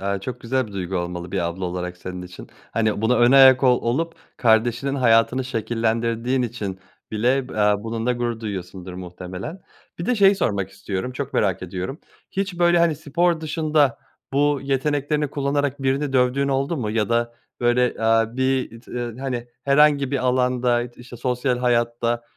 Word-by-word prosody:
Aaa, 100 0 -2
çok 125 +6 -6
güzel 130 +1 -1
bir 105 - -12
duygu 95 -1 -3
olmalı 90 0 -4
bir 100 - 0
abla 85 +1 -2
olarak 90 0 -4
senin 90 0 -7
için. 90 0 -11 0.2
Hani, 110 -2 0
buna 120 +3 +3
önayak 130 +2 +7
ol 125 -1 +4
olup 165 +8 -1 0.2
kardeşinin 120 +4 +2
hayatını 125 0 +3
şekillendirdiğin 115 +1 -1
için 105 -6 -4 0.3
bile 125 +4 +1
b - - -9
aaa, 105 0 +3
bununla 115 +2 -1
gurur 120 -2 -2
duyuyorsundur 95 -3 -6
muhtemelen. 90 - -7 0.4
Bir 170 - -4
de 250 - +2
şeyi 200 -2 +5
sormak 100 - -1
istiyorum. 100 +4 -4
Çok 140 +1 -5
merak 95 -3 +1
ediyorum. 95 - -5 0.3
Hiç, 195 -2 -3
böyle, 175 0 +4
hani, 170 -2 +3
spor 165 +3 0
dışında 155 -3 +1 0.3
bu 145 0 +2
yeteneklerini 145 +2 0
kullanarak 140 -1 -1
birini 135 +1 0
dövdüğün 130 +2 +2
oldu 140 +4 0
mu? 110 -6 -2
Ya 110 -1 0
da, 120 0 0 0.3
böyle, 120 0 +2
aaa, 115 +1 +2
bir 130 -3 0
t - - -18
ııı 120 -1 -4
hani, 125 -3 -3 0.2
herhangi 140 -1 +4
bir 140 - 0
alanda, 125 -1 +2
işte, 120 0 -10
sosyal 125 +1 -1
hayatta, 120 -1 0
120 Hz, 165 wpm, -22 LUFS, 110-135 Hz, 0.4 s, önayak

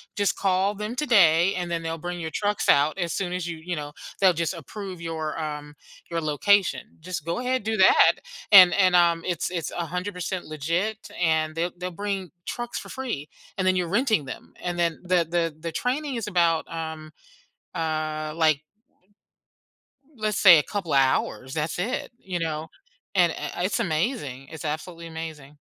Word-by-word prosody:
just 205 -2 +1
call 195 +1 +1
them 210 +3 -4
today, 195 - +4
and 175 -1 -3
then 170 -1 -2
they'll 165 0 -3
bring 175 +1 -5
your 160 - -3
trucks 205 0 0
out 145 +4 +4
as 175 -3 -2
soon 180 -2 -2
as 180 -1 -2
you 170 -1 -4
you 175 +2 -4
know, 145 -1 -5 0.3
they'll 190 - +7
just 170 +2 -1
approve 185 +3 -8
your, 160 -2 -4
um, 150 -2 -5 0.4
your 165 -1 -2
location. 180 +6 +2 0.2
Just 175 -3 -5
go 170 +7 -2
ahead, 255 -1 -1
do 220 +1 -1
that, 190 -3 +6 0.4
and 185 -2 +10
and, 185 -2 +4
um, 170 -1 +4
it's 175 -2 -1
it's 170 -4 -3
100% 180 +2 -3
legit 170 +9 -2
and 160 -2 +2
they'll 170 +2 -1
they'll 180 +1 -4
bring 195 0 -3 0.2
trucks 240 0 -4
for - - -10
free 240 - -4 0.3
and 185 -1 0
then 185 - +4
you're 180 -2 0
renting 220 - +2
them, 130 - -9
and 175 0 -2
then 170 -2 +1
the 180 -1 +2
the 170 -2 0
the 165 +1 -4
training 265 - -1
is 225 -3 -3
about, 170 -4 +2
um, 160 -1 -6 0.6
uh, 155 -1 -2
like 155 -3 +3 1.5
let's 215 -3 -1
say 180 -5 +9
a 150 - +2
couple 190 -7 -3
hours, 130 -1 +1
that's 155 0 -2
it, 225 +9 -2
you 185 -5 -4
know, 160 -1 -3 0.4
and, 175 -3 +4
eh, - - -5
it's 190 - 0
amazing. 155 - -2
It's 160 +1 -8
absolutely 165 +3 -5
amazing. 160 -3 -8
170 Hz, 175 wpm, -25 LUFS, 160-190 Hz, 1.5 s, and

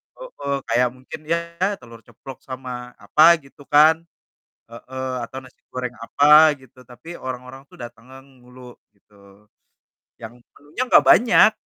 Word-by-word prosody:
heeh, - - -6
kayak 125 +2 +2
mungkin, 130 0 -11
ya, - - +4 0.4
telur 115 -1 -15
ceplok 120 +3 -13
sama 125 -2 -8
apa, 165 +3 +5
gitu, 135 +1 -20
kan, 155 +2 +6 0.8
heeh, 130 +3 -7
atau 130 - -9
nasi 130 -1 -19
goreng 125 -1 -6
apa 150 +6 +5
gitu, 130 0 -21
tapi 125 +7 -16
orang-orang 130 +1 -9
tuh - - -22
datang 120 0 -12
ngang 135 +1 -15
mulu, 125 0 -15 0.2
gitu, 105 +1 -32 1.1
yang 115 +2 -10 0.2
menunya 150 - -6
enggak 250 - +5
banyak. 230 -2 +5
130 Hz, 140 wpm, -21 LUFS, 125-145 Hz, 1.1 s, kan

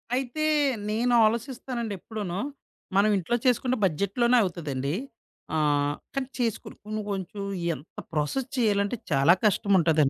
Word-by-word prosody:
అయితే 265 +4 -2 0.5
నేను 235 +3 +1
ఆలోసిస్తానండి 235 0 -2
ఎప్పుడునూ, 200 -4 -5 0.6
మనం 205 +2 +5
ఇంట్లో 190 +6 0
చేసుకుంటే 255 +1 +2
బడ్జెట్‌లోనే 200 +9 +2
అవుతదండి. 145 -6 -2 0.6
ఆహ్, 145 -1 +2 0.2
కానీ 270 -1 -1
చేసుకొని 230 -3 -2
కొన్ని 215 0 -3
కొంచెం 195 +1 -4 0.3
ఎంత 145 +4 -15 0.2
ప్రాసెస్ 155 - -1
చేయాలంటే 205 -2 +2 0.2
చాలా 140 +4 +6
కష్టముంటాదండి. 170 -8 +4
200 Hz, 115 wpm, -27 LUFS, 160-240 Hz, 0.6 s, చాలా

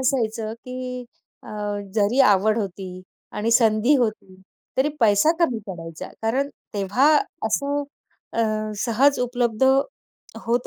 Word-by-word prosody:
असायचं, 225 -4 0
की 250 0 -6 0.4
अ, - - -9 0.4
जरी 220 +5 +2
आवड 210 +2 +3
होती 185 -2 -5 0.4
आणि 220 +2 0
संधी 230 +3 +4
होती. 215 -5 -2 0.4
तरी 265 +3 +3
पैसा 215 +6 +5
कमी 255 -9 +2
पडायचा, 165 -4 -7
कारण 260 +6 0 0.3
तेव्हा 205 +8 +2 0.4
असं 285 +1 0 0.5
अ, 230 - +1 0.4
सहज 260 +6 +3
उपलब्ध 245 -2 -1 0.8
होत 240 +1 +1
230 Hz, 115 wpm, -23 LUFS, 205-255 Hz, 0.8 s, पैसा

